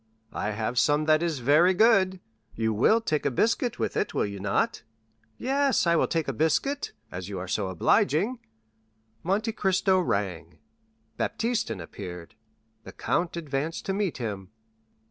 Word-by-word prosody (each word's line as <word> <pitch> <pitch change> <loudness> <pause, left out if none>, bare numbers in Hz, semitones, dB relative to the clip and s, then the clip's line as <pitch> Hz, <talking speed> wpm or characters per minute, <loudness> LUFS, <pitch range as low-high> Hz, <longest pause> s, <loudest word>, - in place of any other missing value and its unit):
"I 105 - -2
have 110 +3 -1
some 150 +1 +2
that 155 0 +4
is 170 -3 -1
very 165 +7 +5
good. 190 -3 +4 0.4
You 110 0 0
will 215 - +4
take 155 -9 -1
a - - +2
biscuit 230 - 0
with - - -2
it, - - -1
will - - +2
you 100 -1 -6
not?" 95 0 0 0.6
"Yes, 275 -3 +1
I 170 0 +3
will - - +2
take 165 -2 -1
a 135 - -1
biscuit, 165 - 0 0.2
as 90 +1 -6
you 100 - -5
are 95 +1 -5
so 100 +1 -1
obliging." 155 - +2 0.8
Monte 205 +6 0
Cristo 190 -2 +2
rang; 95 - -2 0.6
Baptistin 225 - -1
appeared. 90 0 -8 0.5
The - - -11
count 170 -1 -1
advanced 155 0 -3
to 195 - -1
meet 195 -3 -1
him. 100 -6 -5
155 Hz, 155 wpm, -27 LUFS, -, 0.8 s, very